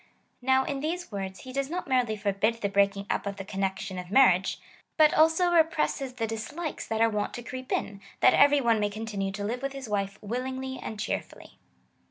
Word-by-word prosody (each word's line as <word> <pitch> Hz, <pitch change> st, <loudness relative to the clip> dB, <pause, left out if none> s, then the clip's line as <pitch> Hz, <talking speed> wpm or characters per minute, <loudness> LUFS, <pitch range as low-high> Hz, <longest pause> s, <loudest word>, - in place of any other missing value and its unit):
Now 265 Hz, +1 st, +3 dB
in 275 Hz, 0 st, -3 dB
these 340 Hz, +3 st, -3 dB
words 190 Hz, -2 st, -5 dB
he 255 Hz, -, -9 dB
does 275 Hz, 0 st, -1 dB
not 360 Hz, +2 st, -4 dB
merely 250 Hz, -5 st, +1 dB
forbid 210 Hz, +3 st, 0 dB
the 200 Hz, -, 0 dB
brealdng 200 Hz, 0 st, +2 dB
up -, -, -2 dB
of 200 Hz, -, -3 dB
the 195 Hz, -, -6 dB
connection 195 Hz, 0 st, -3 dB
of 180 Hz, -1 st, -8 dB
marriage, 190 Hz, -6 st, +4 dB, 0.4 s
but 310 Hz, -1 st, +6 dB
also 325 Hz, +3 st, +4 dB
re 340 Hz, -1 st, +7 dB
presses 305 Hz, -4 st, -2 dB
the 235 Hz, -3 st, -2 dB
dislikes 230 Hz, +9 st, -5 dB
that 225 Hz, 0 st, -1 dB
are 230 Hz, -, +6 dB
wont 210 Hz, -1 st, -2 dB
to 240 Hz, -, -6 dB
creep 255 Hz, +2 st, -7 dB
in, 200 Hz, -1 st, -2 dB, 0.2 s
that -, -, +6 dB
every 285 Hz, 0 st, +5 dB
one 230 Hz, -3 st, +3 dB
may 205 Hz, 0 st, +1 dB
continue 205 Hz, -2 st, -3 dB
to 200 Hz, 0 st, -4 dB
live 230 Hz, +4 st, -2 dB
Avith 275 Hz, +1 st, -4 dB
his 270 Hz, -3 st, -7 dB
wife 200 Hz, -1 st, -2 dB
willingly 260 Hz, +4 st, -4 dB
and 215 Hz, -, -6 dB
cheer 215 Hz, -, -1 dB
fully. -, -, -16 dB
230 Hz, 215 wpm, -28 LUFS, 200-270 Hz, 0.4 s, re